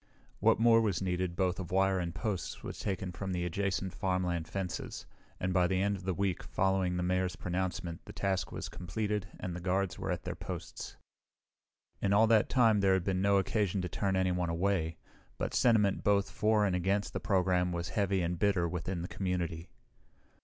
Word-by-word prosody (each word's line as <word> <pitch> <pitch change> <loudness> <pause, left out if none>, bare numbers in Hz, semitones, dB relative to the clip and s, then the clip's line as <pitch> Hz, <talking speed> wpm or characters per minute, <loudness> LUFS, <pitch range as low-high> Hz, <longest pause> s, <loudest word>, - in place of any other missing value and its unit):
What - - +4
more 115 0 +6
was 105 -6 +1
needed, 90 -2 -1
both 90 0 0
of 90 -2 -5
wire 95 0 +2
and 85 -2 -3
posts, 105 -7 -3
was - - -6
taken 95 -2 -2
from 95 +1 -4
adjacent 95 +2 -1
farmland 90 -4 -1
fences, 95 -2 -4 0.3
and 90 0 -1
by 90 -1 +4
the 95 0 +1
end 100 +1 +1
of 95 -1 -9
the 95 - 0
week 95 -2 0
following 95 -2 0
the 90 - -1
Mayor's 90 0 0
pronouncement 90 -2 -3
the - - -9
task 95 -2 -1
was - - -5
completed 105 +3 -3
and 90 -2 -4
the - - -4
guards 95 +1 -1
were - - -3
at - - -2
their - - -3
posts. - - -7 1.1
In 100 - +2
all 110 +2 +6
that 110 -1 +4
time 115 -5 +4
there 95 -1 +4
had 95 - 0
been 95 -1 0
no 100 0 +4
occasion 100 -1 +1
to 90 - -3
turn 95 +2 0
anyone 90 -2 +1
away, 85 -1 0 0.4
but - - -2
sentiment 105 -5 +3
both 100 -1 +2
for 105 -1 +2
and 95 -3 +1
against 95 +3 0
the - - -2
program 90 -2 +2
was 85 -1 -3
heavy 100 -4 +1
and 85 0 -2
bitter 95 -4 +2
within 90 +1 -3
the - - -4
community. 90 -4 -3
95 Hz, 190 wpm, -32 LUFS, 90-100 Hz, 1.1 s, more